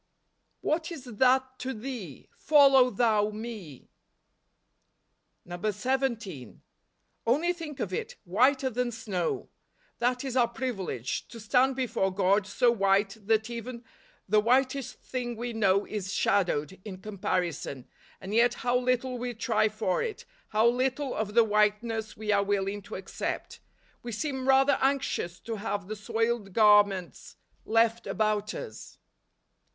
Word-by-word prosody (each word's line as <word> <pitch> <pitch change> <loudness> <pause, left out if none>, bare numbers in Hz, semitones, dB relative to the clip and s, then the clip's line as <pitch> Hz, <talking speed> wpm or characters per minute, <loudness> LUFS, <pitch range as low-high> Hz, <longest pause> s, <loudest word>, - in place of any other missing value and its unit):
" - - -29
IHiaf 320 +2 0
is 315 -6 -7
that 260 +2 +1
to 260 -1 -4
thee? 220 - -7
follow 275 -4 +6
thou 215 -2 +2
me" 215 - -8 1.6
17. 210 - -2 0.7
Only 315 +9 +2
think 320 -5 -8
of - - -3
it, 465 +2 -4
whiter 260 +8 +2
than 250 +1 -1
snow! 205 -7 -3 0.5
That 250 +2 0
is 265 -2 -4
our 245 -2 +4
privilege, 220 - -4
to 230 - -11
stand 255 +5 +2
before 240 -7 0
God 195 +1 +2
so 240 +4 +3
white 195 -2 +2
that 220 +1 +2
even 235 +1 -6 0.4
the 210 +2 +4
whitest 255 +3 +1
thing 245 -2 -4
we 240 +1 -4
know 200 -2 +2
is 195 -3 -4
shadowed, 185 -3 0
in 195 -4 -7
comparison; 180 - -3 0.3
and 190 +2 -7
yet 235 +2 +4
how 245 0 +2
little 250 0 0
we 245 0 -4
try 220 -1 +1
for 215 -3 -1
it; 470 +1 -4 0.2
how 215 +2 +2
little 260 +3 0
of 210 0 -3
the 235 - +7
whiteness 215 +1 0
we 210 0 -2
are 200 -1 +4
willing 200 0 -1
to - - -9
accept. 190 - -5 0.4
We 240 - -6
seem 265 +2 -3
rather 270 +1 +4
anxious 260 -10 0
to 225 -1 -5
have 205 -2 -3
the 215 - -4
soiled 225 -1 -1
gar¬ 210 -1 +7
ments 185 -3 -8 0.3
left 230 +1 +2
about 215 -1 0
us. 480 - -8
225 Hz, 140 wpm, -28 LUFS, 205-255 Hz, 1.6 s, the